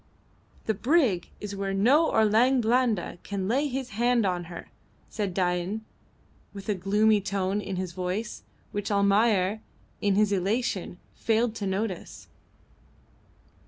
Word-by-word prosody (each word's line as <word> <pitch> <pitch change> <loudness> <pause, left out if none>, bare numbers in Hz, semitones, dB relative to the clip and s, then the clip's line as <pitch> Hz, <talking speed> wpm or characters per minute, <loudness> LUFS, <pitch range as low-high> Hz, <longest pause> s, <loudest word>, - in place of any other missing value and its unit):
"The 220 - +1
brig 240 - +2
is 205 -1 -6
where 195 0 -2
no 270 +11 +4
Orang 225 +5 +4
Blanda 230 -6 +1
can 195 -2 -4
lay 270 +7 +1
his 260 -1 -4
hands 235 +1 +2
on 180 -2 -1
her," 170 0 -10 0.4
said 205 -3 -2
Dain, 180 +4 -1 0.7
with 195 -1 -8
a - - +3
gloomy 205 +3 +2
tone 195 0 -1
in 195 - -4
his 185 -1 -3
voice, 185 +5 -4 0.3
which 205 0 -3
Almayer, 200 0 +2 0.4
in 200 -2 +2
his 210 0 +3
elation, 195 -1 -1 0.2
failed 225 0 +1
to 200 - -3
notice. 190 -1 -4
205 Hz, 130 wpm, -27 LUFS, 190-225 Hz, 0.7 s, no